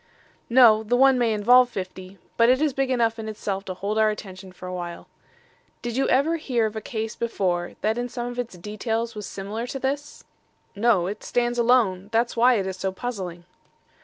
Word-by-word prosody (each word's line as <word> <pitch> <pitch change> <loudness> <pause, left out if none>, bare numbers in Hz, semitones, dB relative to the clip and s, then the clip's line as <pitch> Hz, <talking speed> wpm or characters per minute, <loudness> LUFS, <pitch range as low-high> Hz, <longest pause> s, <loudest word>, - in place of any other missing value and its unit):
"No; 235 -3 +7
the 220 +3 0
one 265 0 +5
may 235 -2 +2
involve 245 +4 +5
fifty, 185 -2 -7 0.2
but 230 0 +4
it 255 +1 +4
is 300 -2 +1
big 270 0 0
enough 230 -3 +1
in 220 0 -5
itself 200 -2 -4
to 185 - -5
hold 205 +4 -2
our 215 0 +4
attention 190 -3 -7
for 185 - -12
a 180 - -5
while. 175 -1 -6 0.8
Did 240 -1 -3
you 270 - +1
ever 300 +6 +2
hear 250 -7 0
of 215 0 -4
a 220 - -4
case 220 -1 -4
before, 180 -6 -1
that 220 +2 0
in 245 0 -3
some 240 0 -4
of 245 0 -5
its 230 -7 -5
details 225 +4 -3
was 210 -2 -7
similar 210 +5 -5
to 270 - -4
this?" 280 +2 -4 0.5
"No, 205 -4 +3
it 205 +3 -5
stands 240 0 0
alone. 220 -6 +2
That's 235 +1 +1
why 245 +2 +5
it 195 -4 0
is 190 -1 -4
so 190 0 -2
puzzling." 190 -6 -6
225 Hz, 205 wpm, -24 LUFS, 195-245 Hz, 0.8 s, No